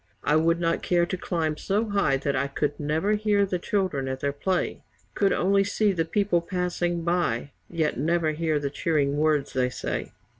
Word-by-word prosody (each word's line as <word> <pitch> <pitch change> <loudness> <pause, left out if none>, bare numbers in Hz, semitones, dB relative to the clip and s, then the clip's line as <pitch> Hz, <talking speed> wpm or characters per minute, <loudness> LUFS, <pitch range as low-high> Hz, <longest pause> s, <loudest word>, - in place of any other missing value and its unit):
I 150 - +2
would 165 +2 +3
not 165 -1 0
care 175 -1 +2
to 185 - -3
climb 160 -4 -2
so 210 +6 -1
high 200 -9 +2
that 140 +1 -1
I 135 +1 0
Could 145 +1 -2
never 155 +7 0
hear 210 -1 +2
the 185 -2 -2
children 180 -9 -1
at 130 0 -3
their 140 +1 0
play, 180 +6 -1 0.3
Could 200 -1 +2
only 195 +2 +3
see 205 +1 +1
the 165 -4 0
people 180 0 +1
passing 175 -1 -2
by, 165 -7 0 0.2
Yet 160 -6 -1
never 165 +1 +1
hear 155 0 0
the 140 -1 -2
cheering 145 -2 0
words 150 -2 +1
they 125 -1 +1
say. 125 - -4
165 Hz, 190 wpm, -26 LUFS, 145-185 Hz, 0.3 s, would